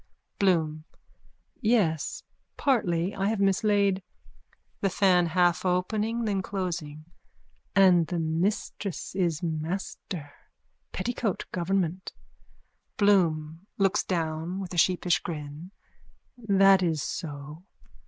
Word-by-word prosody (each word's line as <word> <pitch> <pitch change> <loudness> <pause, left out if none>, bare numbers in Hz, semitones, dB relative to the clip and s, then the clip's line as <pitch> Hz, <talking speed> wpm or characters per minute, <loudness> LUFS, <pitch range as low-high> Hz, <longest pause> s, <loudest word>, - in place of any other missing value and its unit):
BLOOM: 160 -5 +1 0.8
Yes. 210 - +1 0.3
Partly, 185 - +1
I 195 0 -1
have 215 -1 0
mislaid... 200 0 +2 0.8
THE 195 - +1
FAN: 185 -2 +3
(Half 175 +1 +2
opening, 210 +6 0
then 200 -3 0
closing.) 170 -6 -4 0.7
And 180 -4 +5
the 175 - -3
missus 170 +4 -2
is 175 -3 0
master. 160 -1 -4 0.6
Petticoat 225 0 -2
government. 185 0 -1 0.8
BLOOM: 170 -4 +2
(Looks 195 0 +2
down 165 +1 -2
with 185 -2 -6
a - - -4
sheepish 180 0 +3
grin.) 150 +1 -7 0.7
That 195 -4 +4
is 160 -4 0
so. 150 -1 -6
180 Hz, 95 wpm, -27 LUFS, 160-195 Hz, 0.8 s, And